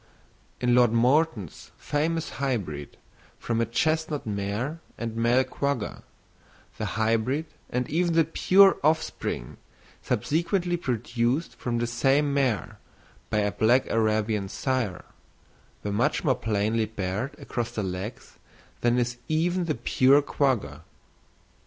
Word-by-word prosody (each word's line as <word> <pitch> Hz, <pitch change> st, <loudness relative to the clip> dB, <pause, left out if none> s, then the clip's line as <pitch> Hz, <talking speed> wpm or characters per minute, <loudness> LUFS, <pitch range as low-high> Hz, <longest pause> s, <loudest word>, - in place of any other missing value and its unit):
In 125 Hz, -1 st, +2 dB
Lord 120 Hz, -2 st, +5 dB
Morton's 120 Hz, -, +1 dB
famous 160 Hz, +2 st, -1 dB
hybrid, 95 Hz, -, -3 dB, 0.4 s
from 115 Hz, -1 st, -1 dB
a 115 Hz, -, 0 dB
chestnut 155 Hz, +4 st, 0 dB
mare 105 Hz, +9 st, -3 dB, 0.2 s
and 115 Hz, -1 st, -4 dB
male 120 Hz, +3 st, +3 dB
quagga, 140 Hz, -6 st, -3 dB, 0.8 s
the -, -, -1 dB
hybrid 115 Hz, +7 st, +1 dB, 0.2 s
and 125 Hz, 0 st, -1 dB
even 170 Hz, +2 st, +1 dB
the 165 Hz, -, +6 dB
pure 190 Hz, +4 st, +5 dB
offspring 155 Hz, -, -1 dB, 0.4 s
subsequently 175 Hz, +3 st, 0 dB
produced 120 Hz, 0 st, -1 dB
from 120 Hz, -1 st, -2 dB
the 120 Hz, -, 0 dB
same 135 Hz, +4 st, +2 dB
mare 130 Hz, -7 st, 0 dB, 0.5 s
by 105 Hz, -, +1 dB
a 105 Hz, 0 st, 0 dB
black 120 Hz, +6 st, +3 dB
Arabian 110 Hz, -2 st, +1 dB
sire, 125 Hz, -8 st, -2 dB, 0.8 s
were 105 Hz, -, -2 dB
much 120 Hz, +9 st, +1 dB
more 140 Hz, -6 st, +3 dB
plainly 110 Hz, 0 st, 0 dB
barred 105 Hz, +4 st, -4 dB
across 120 Hz, -1 st, -3 dB
the 115 Hz, -3 st, -3 dB
legs 95 Hz, +4 st, -6 dB, 0.4 s
than 120 Hz, 0 st, +2 dB
is 120 Hz, 0 st, 0 dB
even 175 Hz, +3 st, +1 dB
the 155 Hz, -, -1 dB
pure 130 Hz, +4 st, +4 dB
quagga. 110 Hz, -, 0 dB
120 Hz, 120 wpm, -26 LUFS, 110-145 Hz, 0.8 s, the